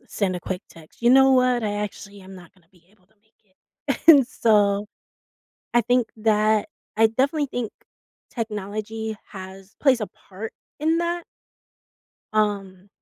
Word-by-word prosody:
send 195 -3 -1
a - - -7
quick 185 +1 -5
text, 165 +6 -18
"You 240 - +5
know 265 +1 +6
what? 250 -2 +3
I 205 -1 -1
actually 205 -1 -6
am 190 0 -12
not 180 -1 -14
gonna 180 -4 -29
be 175 -2 -26
able 195 -3 -30
to - - -35
make 220 0 -40
it." - - -6
And 285 -6 +9
so, 205 -4 +2 0.9
I 240 - +5
think 245 +1 +1
that 215 -1 +2 0.3
I 225 0 +6
definitely 280 +6 0
think 245 -4 -4 0.6
technology 215 0 -5
has 190 +1 -10
plays 260 -5 +4
a 210 - -2 0.2
part 205 +4 -7 0.3
in 320 +3 +2
that? 345 0 -2 1.1
Um 200 -3 -1
215 Hz, 150 wpm, -23 LUFS, 195-245 Hz, 1.1 s, And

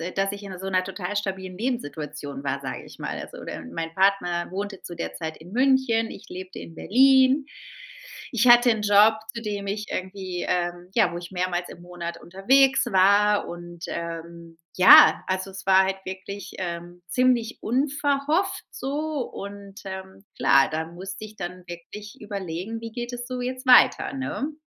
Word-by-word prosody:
dass 195 0 +1
ich 205 0 -8
in 190 -2 -8
so 190 - -5
'ner 185 -1 +2
total 190 +1 -5
stabilen 190 -3 -3
Lebenssituation 150 - -4
war, 140 0 -2
sage 135 - -5
ich - - -14
mal. - - -4
Also, - - -9
de - - -6
mein 165 - -5
Partner 185 -3 +1
wohnte 200 0 -5
zu 175 - -8
der 80 - -5
Zeit 160 - -5
in 175 +4 -14
München, 255 -2 +2
ich - - -12
lebte 185 0 -8
in 165 - -10
Berlin, 265 +3 +4 0.8
ich 240 -1 +2
hatte 240 0 +8
'n 220 - -1
Job, 210 +2 +6 0.2
zu 230 - -4
dem 205 -2 -4
ich 210 +2 -3
irgendwie 185 -1 -4
ähm, 175 0 -2
ja, 220 -6 +3
wo 170 - -5
ich 175 0 -9
mehrmals 180 -1 -2
im 175 - -11
Monat 175 -1 -7
unterwegs 265 +11 +3
war. 200 +2 +4
Und, 175 0 -9
ähm, 170 0 -7 0.2
ja, 185 - +8
also 185 +1 -2
es 190 - -9
war 190 0 +6
halt 190 0 -2
wirklich, 190 +2 -7
ähm, 175 -1 -6
ziemlich 245 +1 +1
unverhofft 285 - 0
so 295 +2 -3
und, 200 0 -9
ähm, 190 0 -8
klar, 135 0 +5
da 160 +1 -2
musste 190 +5 -8
ich 215 0 -13
dann 180 -1 -7
wirklich 190 +5 -10
überlegen, 200 +1 -5
wie 230 -1 -7
geht 240 +1 -5
es 245 +1 -6
so 250 -1 -4
jetzt 255 +1 -4
weiter, 255 +2 +6
ne? 270 +3 -3
195 Hz, 175 wpm, -25 LUFS, 175-230 Hz, 0.8 s, hatte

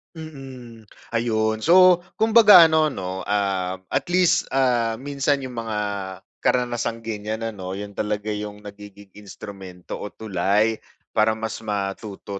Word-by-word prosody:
Mm, 130 -8 -11 0.2
ayon. 110 -2 0
So, 180 +6 +6 0.2
kumbaga 220 -5 +7
ano 155 -1 +3
'no, 95 -8 -5
ah, 95 -3 -1 0.2
at - - -1
least, 180 0 +2
ah, 120 -4 +2
minsan 140 +2 -1
yung 125 -2 -7
mga 110 -2 -4 0.6
karanasang 120 -2 -1
ganiyan 110 0 -4
ano, 95 -4 -5
yun 100 +1 -7
talaga 105 +1 -3
yung 105 0 -6
nagiging 100 -1 -12
instrumento 95 -3 -9
o - - -5
tulay 105 +2 0 0.3
para 110 +1 +2
mas 110 0 -5
matuto 100 -1 -5
110 Hz, 125 wpm, -23 LUFS, 100-130 Hz, 0.6 s, kumbaga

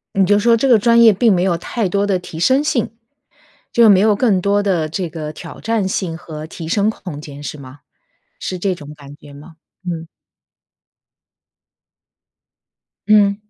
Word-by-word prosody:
你 195 -1 +3
就 205 +2 +3
说 235 +3 +3
这 270 +4 0
个 240 -3 +6
专 235 +2 +4
业 225 -2 +7
并 215 +3 +3
没 180 -2 +1
有 180 -2 +1
太 200 +5 -3
多 200 +2 0
的 195 -2 +1
提 175 -2 -10
升 260 - +3
性， 295 -6 -1 0.8
就 235 -1 +5
没 200 -3 +6
有 210 +2 +3
更 205 -3 +1
多 200 +1 +1
的 175 -6 0
这 175 +3 -4
个 155 -2 -6
挑 - - -11
战 225 -4 -1
性 180 -3 -3
和 155 -3 -8
提 160 0 -8
升 205 +4 +1
空 180 -8 -8
间 145 -1 -10
是 145 - -6
吗？ 135 +1 -13 0.6
是 185 - -4
这 190 +1 -1
种 150 -4 -10
感 145 -1 -13
觉 145 -1 -15
吗？ 150 +4 -14 0.3
嗯。 165 -2 -5 3.0
嗯。 205 -2 +4
190 Hz, 185 characters per minute, -18 LUFS, 160-210 Hz, 3.0 s, 业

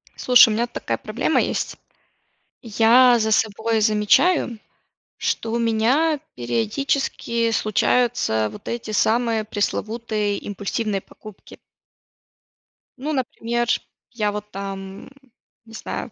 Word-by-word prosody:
Слушай, 250 -1 +6
у - - 0
меня 235 +3 0
такая 240 - -4
проблема - - 0
есть. - - -3 0.8
Я 235 +2 +5
за 220 0 0
собой 220 +1 +1
замечаю, 220 - +2 0.6
что 225 - -2
у 235 - 0
меня 245 +8 +2 0.2
периодически 230 - -1
случаются 215 - +1
вот 205 - -12
эти 235 -2 -4
самые 225 +1 +1
пресловутые 215 0 -2
импульсивные 205 0 -3
покупки. 215 +1 -14 1.4
Ну, 295 +4 -3
например, 240 -3 -2 0.4
я, 215 -4 -1
вот, 210 0 -6
там, 195 0 -7
м, - - -16 0.5
не 225 - -16
знаю, 225 - -6
225 Hz, 110 wpm, -22 LUFS, 210-240 Hz, 1.4 s, Слушай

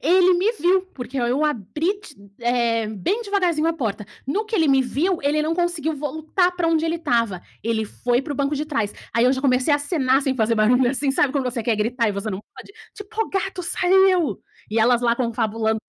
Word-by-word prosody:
ele 365 +3 +5
me 385 +6 +2
viu, 370 -2 +2
porque 260 +1 -5
oi 240 0 0
eu 280 +5 +1
abri 300 - -1
ti 315 -9 -14 0.2
eh, 235 -2 +1
bem 220 - -2
devagarzinho 365 -7 0
a - - +2
porta. 225 -9 -3 0.2
No 400 +11 -1
que 435 +1 -6
ele 320 -4 +3
me 270 -1 +4
viu, 320 +9 0
ele 290 +2 +1
não 320 +2 0
conseguiu 335 -3 -1
voltar 315 +5 0
para 355 -2 -1
onde 325 -1 +2
ele 330 +1 0
estava, 230 - 0 0.2
ele 225 -1 -1
foi 245 +3 -1
para 290 - -5
o - - -6
banco 280 +1 0
de 295 +1 -2
trás. 225 -9 -1 0.2
Aí 230 +1 +3
eu 255 - +4
já 260 - -2
comecei 260 +1 +2
a - - +5
acenar, 285 -3 +1
sem 270 -1 0
fazer 230 -2 +1
barulho, 240 +3 +3
assim, 270 +1 0
sabe 270 0 +1
quando 280 -2 -1
você 245 -2 -2
quer 225 -1 +1
gritar 230 +2 0
e - - -1
você 200 +2 -4
não 190 0 -4
pode? - - -12 0.2
Tipo: 440 +1 -3
"O - - -8
gato 385 -1 -2
saiu!" 360 - +2 0.3
e 220 - 0
elas 240 +2 +4
lá 235 -1 +3
confabulando 225 -2 -1
275 Hz, 225 wpm, -22 LUFS, 235-340 Hz, 0.3 s, ele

